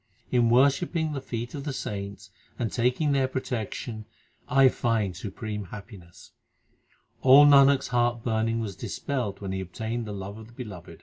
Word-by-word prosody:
In 120 -2 +3
worshipping 145 +6 +2
the 135 - -4
feet 120 -1 -5
of 140 - -5
the 145 -1 -3
saints 100 -5 -6 0.3
and 115 - -2
taking 125 +5 +1
their 135 -2 +2
protection 115 -3 -4 0.4
I 135 +1 +6
find 115 -7 0
supreme 105 0 -5
happiness. 95 -3 -12 0.9
All 135 +3 +8
Nanak 140 -1 +7
s - - -6
heart 120 -1 +1
burning 115 0 0
was 100 -4 -5
dispelled 115 -6 -4
When 95 -1 -4
he 95 0 -2
obtained 110 +6 -4
the - - -5
love 100 +2 -7
of 110 - -11
the 120 - -18
Beloved. 105 -9 -9
1 85 - -10
Gajmoti. - - -22
115 Hz, 175 wpm, -27 LUFS, 105-130 Hz, 0.9 s, All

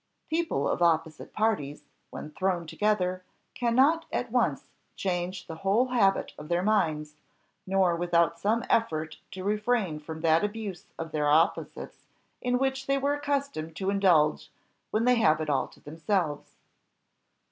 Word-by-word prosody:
People 320 - 0
of - - -1
opposite 165 -2 +1
parties, 210 -10 -1 0.3
when 155 - -8
thrown 180 0 -1
together, 185 0 0 0.3
cannot 265 +7 +3
at - - -2
once - - 0 0.3
change 180 0 -3
the 160 - -8
whole 205 +8 +2
habit 200 -6 +2
of 150 - -9
their 175 +1 +1
minds, 155 -8 0 0.5
nor 190 -2 +3
without 170 -1 +1
some 220 +5 +1
effort 160 -8 0 0.2
refrain 210 -3 0
from 160 +1 -8
that 165 +1 +3
abuse 210 -4 -4
of 165 -1 -6
their 150 -1 0
opposites 160 +5 0 0.3
in 250 0 +1
which 270 +1 -1
they 275 - +2
are 280 +1 +1
accustomed 280 - -2
to 195 +2 -1
indulge 175 -7 +3 0.4
when 220 +2 0
they 250 -1 +4
have 155 -8 +4
it 155 -1 -1
all 135 -2 +1
to - - -19
themselves. 160 0 -2
185 Hz, 145 wpm, -28 LUFS, 160-225 Hz, 0.5 s, they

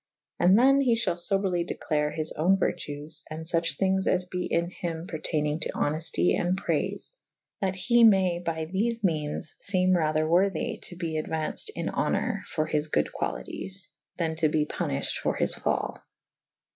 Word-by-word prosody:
And 180 +3 +6
than 275 +3 +5
he 245 -4 +3
fhall 225 -5 0
foberly 180 0 0
declare 150 -3 -1
his 155 0 -3
owne 180 +5 +3
vertues 150 -3 -3
& - - -20
fuche 165 +1 0
thynges 190 0 +1
as 180 0 +2
be 180 0 -3
in 170 +1 0
hym 165 -2 -4
perteynynge 155 -2 -2
to - - -2
honefte 145 - +1
and 180 +2 0
prayfe - - -2 0.3
/ - - -58
that 190 -1 0
he 235 +5 +3
may 190 -5 +5
by 165 -2 -3
thefe 220 +6 -1
meanes 155 -4 -1
feme 185 -2 +3
rather 155 -2 +1
worthy 180 +1 +1
to 175 - -8
be 160 -3 -2
auaunced 160 - -3
in - - -3
honour 220 -6 0
for 155 - -1
his 155 0 0
good 75 - 0
qualities 185 - -5
/ - - -50
than 165 -2 -1
to 160 -2 +3
be 150 0 +1
punifhed - - -2
for - - -1
his - - +1
fall. - - -2
170 Hz, 170 wpm, -27 LUFS, 155-190 Hz, 0.3 s, And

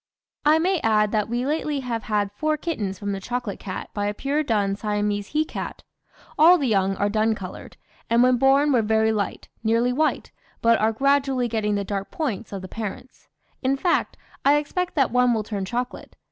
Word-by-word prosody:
"I 305 +1 +6
may 360 +2 +1
add 210 -3 +2
that 215 -1 0
we 240 +2 -1
lately 295 -1 -1
have 235 -4 -4
had 205 -2 0
four 305 +9 -1
kittens 220 - -3
from 205 +1 -4
the 195 - -3
chocolate 240 0 -4
cat 185 - -6
by 205 -1 -1
a 205 - -2
pure 280 +6 0
dun 205 -8 0
Siamese 205 -1 -1
he 310 +1 0
cat. - - -6 0.6
All 340 +4 +8
the 285 - -1
young 195 -3 +2
are 205 - 0
dun 220 +1 +1
coloured, 185 -3 -9 0.3
and 235 +1 +4
when 255 0 +4
born 275 +3 +4
were 240 - +4
very 220 0 +2
light, 205 -3 -3 0.2
nearly 230 +2 +2
white, 310 +4 0 0.3
but 230 0 +4
are 220 +1 +2
gradually 270 +1 +1
getting 215 -2 -1
the 200 - -1
dark 195 0 -4
points 235 - -3
of 195 -2 -6
the - - -6
parents; 220 +5 -7 0.3
in 270 +1 +1
fact, 350 +5 0 0.3
I 280 +1 +5
expect 345 +5 -2
that 275 -5 +2
one 250 -1 +3
will 220 - -1
turn 200 -2 -4
chocolate. 245 +4 -5
230 Hz, 200 wpm, -24 LUFS, 205-275 Hz, 0.6 s, All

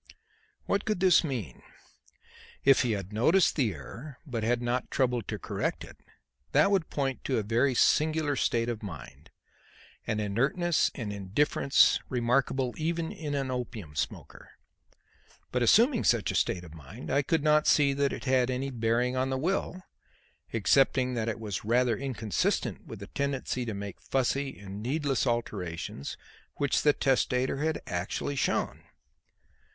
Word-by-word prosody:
What 200 - 0
could 215 -4 -1
this 185 -2 +5
mean? 120 - -4 1.0
If 135 -1 +6
he 120 -3 +1
had 100 0 -5
noticed 160 - +3
the 125 -8 +1
error 125 - -10
but 120 -6 -3
had 120 +2 +1
not 120 +1 -2
troubled 125 -4 0
to - - -3
correct - - -3
it, - - -12 0.6
that 200 - +5
would 190 -5 +1
point 135 -3 -2
to 130 - 0
a 110 - 0
very 120 +5 +1
singular 155 +2 +2
state 115 -2 +1
of 120 -2 -3
mind, 100 -6 -9 0.8
an 110 - -1
inertness 135 - +1
and 110 -5 -4
indifference 105 +8 +3
remarkable 125 +1 +1
even 165 +1 -2
in 150 -3 -4
an 135 -2 -2
opium 115 -11 -5
smoker. - - -5 1.0
But 125 - 0
assuming 230 - +4
such 115 -5 +2
a - - -5
state 90 +1 0
of 80 -3 -12
mind, 80 - -9
I 140 - +3
could 155 +2 0
not 150 0 +4
see 140 -2 +4
that 140 0 +1
it - - -6
had 130 -1 +2
any 130 +2 -2
bearing 120 +1 0
on 130 +1 0
the 130 - -1
will, 185 +4 -2 0.7
excepting 130 +3 +3
that 115 -2 -1
it 110 - -4
was 105 -4 -4
rather 120 +2 +2
inconsistent 120 -5 -2
with - - -9
the - - -6
tendency 135 0 -2
to 110 -3 -4
make 100 -1 -7
fussy 135 +1 -1
and 100 0 -8
needless 140 +2 0
alterations 90 - -3 0.4
which 140 -1 +1
the 150 - +5
testator 130 -1 +1
had 155 +2 -1
actually 90 +10 -3
shown. 130 - -1
125 Hz, 155 wpm, -29 LUFS, 110-140 Hz, 1.0 s, If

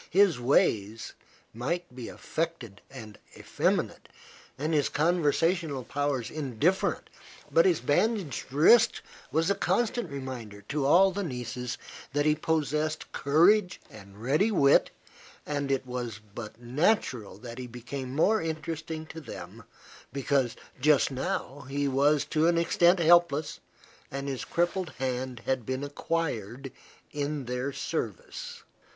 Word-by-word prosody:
His 185 -6 +4
ways 115 -4 +1 0.4
might 135 +5 -3
be 125 -3 -6
affected 160 -11 -4
and 110 -6 -10 0.2
effeminate - - -1 0.5
and 155 +4 -1
his 145 -3 +2
conversational 165 -2 +1
powers 140 -3 -2
indifferent; 155 +5 0 0.4
but - - +5
his 360 - +2
bandaged 185 - 0
wrist 225 - +5 0.3
was 165 +4 +2
a - - +5
constant 240 +3 0
reminder 125 -7 -7
to 145 -2 0
all 190 +6 +6
the 200 +2 -3
nieces 125 - -4 0.4
that 145 +1 +1
he 150 - +5
possessed 155 0 -1
courage 180 +7 +3
and 100 -1 -13
ready 150 - +2
wit, 140 -10 +4 0.6
and 145 -2 -2
it 135 -1 0
was 120 -4 -5
but 110 0 -8
natural 125 - 0
that 120 0 -9
he 125 - -5
became 125 +2 -6
more 215 +8 +3
interesting 160 0 -4
to 160 +1 -9
them - - -9 0.5
because 135 -3 0 0.2
just 145 0 +4
now 140 -1 -3
he 140 +1 0
was 140 +2 +3
to 155 +1 +2
an 170 0 +3
extent 170 +2 +4
helpless, 165 -3 +3 0.5
and 140 +1 -5
his 135 -2 -3
crippled 175 0 -1
hand 130 -2 -3
had 130 -2 0
been 130 +4 -3
acquired 135 -5 -3 0.4
in 145 -1 -3
their 125 +3 -2
service. 485 - -5
145 Hz, 130 wpm, -28 LUFS, 125-165 Hz, 0.6 s, all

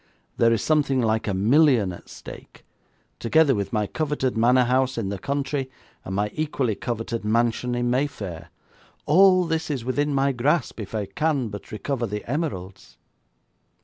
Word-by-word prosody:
There 115 -1 +4
is 115 - +1
something 145 -4 +2
like 110 -2 0
a 100 - 0
million 120 0 +4
at 85 - -13
stake, - - -12 0.5
together 150 +4 +4
with 100 -4 -2
my 105 -2 0
coveted 145 +1 -2
manor 125 +3 +4
house 130 +1 +1
in 105 -4 -2
the 100 -1 -4
country, 140 +2 -2 0.3
and 95 - -5
my 105 +1 0
equally 140 -7 -1
coveted 115 +1 -4
mansion 120 +3 +1
in 120 0 0
Mayfair. 110 - -3 0.6
All 185 +3 +5
this 160 -1 -2
is 135 -6 -3
within 145 +3 0
my 140 0 +2
grasp 135 +3 0
if 105 0 -6
I 105 -2 -1
can 135 +4 -1
but 105 0 -9
recover 120 +2 -2
the 105 0 -5
emeralds.' 115 - -4
125 Hz, 160 wpm, -24 LUFS, 110-145 Hz, 0.6 s, All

